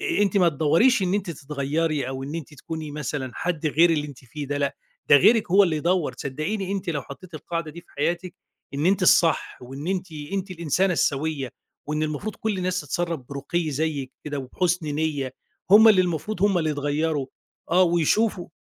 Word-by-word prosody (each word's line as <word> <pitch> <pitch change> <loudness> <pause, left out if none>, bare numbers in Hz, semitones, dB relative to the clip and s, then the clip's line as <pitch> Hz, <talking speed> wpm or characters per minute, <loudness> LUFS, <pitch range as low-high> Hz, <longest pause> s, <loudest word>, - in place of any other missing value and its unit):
آآ، 205 - +1
أنتِ 200 0 +1
ما 180 -3 +5
تدوّريش 165 - +3
إن 185 0 +1
أنتِ 200 -3 -1
تتغيري 145 -1 -2
أو 130 0 -5
إن 145 +4 -6
أنتِ 155 -2 -6
تكوني 155 +2 -6
مثلًا 145 -3 -4
حد 165 -3 -2
غير 165 +3 +4
اللي 150 -2 0
أنتِ 140 - -11
فيه، 145 +4 -7
ده 145 +1 -2
لأ. 140 -1 -1 0.3
ده - - +9
غيرِك 220 - +4
هو 200 +3 +7
اللي 170 -5 +1
يدوّر. 170 +1 0
صدقيني 180 +8 -3
أنتِ 195 -3 -2
لو 145 -4 -2
حطيتِ 170 +5 -12
القاعدة 165 +1 -4
دي 170 - -10
في 175 - -29
حياتِك، 175 +4 -1 0.4
إن 145 +4 0
أنتِ 195 +1 +2
الصح، 170 -2 +3
وإن 135 +5 -8
أنتِ 185 -3 -2 0.2
أنتِ 195 0 -2
الإنسانة 180 +2 +1
السويّة، 145 -4 0 0.4
وإن 150 +1 -1
المفروض 155 +8 -3
كل 215 -3 -2
الناس 185 0 -1
تتصرف 170 -5 -2
برُقي 150 +4 -2
زيّك 145 -2 -2
كده 145 -1 -4
وبحُسن 165 +5 -1
نيّة، 145 -3 -2 0.4
هُم 220 +2 +9
اللي 205 -4 +6
المفروض 180 +3 -2
هُم 200 -3 +4
اللي 160 -2 0
يتغيروا. 145 0 -1 0.4
آه، 180 +2 +5
ويشوفوا 175 +3 +2
160 Hz, 185 wpm, -24 LUFS, 145-185 Hz, 0.4 s, ده